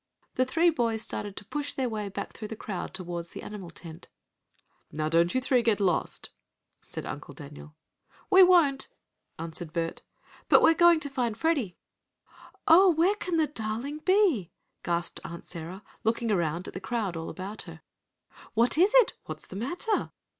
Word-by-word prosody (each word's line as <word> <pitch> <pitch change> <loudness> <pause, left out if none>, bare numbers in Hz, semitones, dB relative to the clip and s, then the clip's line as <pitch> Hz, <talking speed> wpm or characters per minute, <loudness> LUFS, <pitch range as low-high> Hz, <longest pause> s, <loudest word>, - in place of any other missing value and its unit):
The 255 - +2
three 335 +6 +3
boys 230 -6 -1
started 205 -1 -5
to - - -8
push 290 +5 -3
their 260 -2 -1
way 215 -3 -3
back 195 - -6
through 215 - -7
the 220 - -6
crowd 200 -3 -5
toward 175 -2 -5
the - - -9
animal 200 -4 -7
tent. 165 -1 -11 0.8
"Now 155 +1 -2
don't 170 +4 +3
you - - +4
three 255 -1 +2
get 225 -3 +2
lost," 180 -5 -1 0.5
said - - -7
Uncle 145 -1 -7
Daniel. 145 +2 -11 0.6
"We 380 0 +8
won't!" 340 -7 +5 0.5
answered 165 0 -7
Bert, 165 -1 -2 0.5
"but - - +7
we're 325 - +7
going 345 -1 +5
to 285 - -1
find 240 -5 -1
Freddie!" 280 - 0 0.9
"Oh, 370 +4 +8
where 345 +4 +3
can 365 -5 -2
the 315 - +4
darling 255 +2 -4
be?" 360 - +3 0.3
gasped 170 0 -2
Aunt 170 0 -8
Sarah, 175 +3 -8 0.2
looking 230 0 0
around 170 -2 0
at - - -8
the - - -5
crowd 205 -4 -2
all 165 0 -5
about 195 +3 -6
her. 160 -1 -11 0.7
"What 235 +7 +3
is 380 +4 +5
it? - - +6
What's - - -7
the - - -11
matter?" 350 - -1
220 Hz, 170 wpm, -28 LUFS, -, 0.9 s, We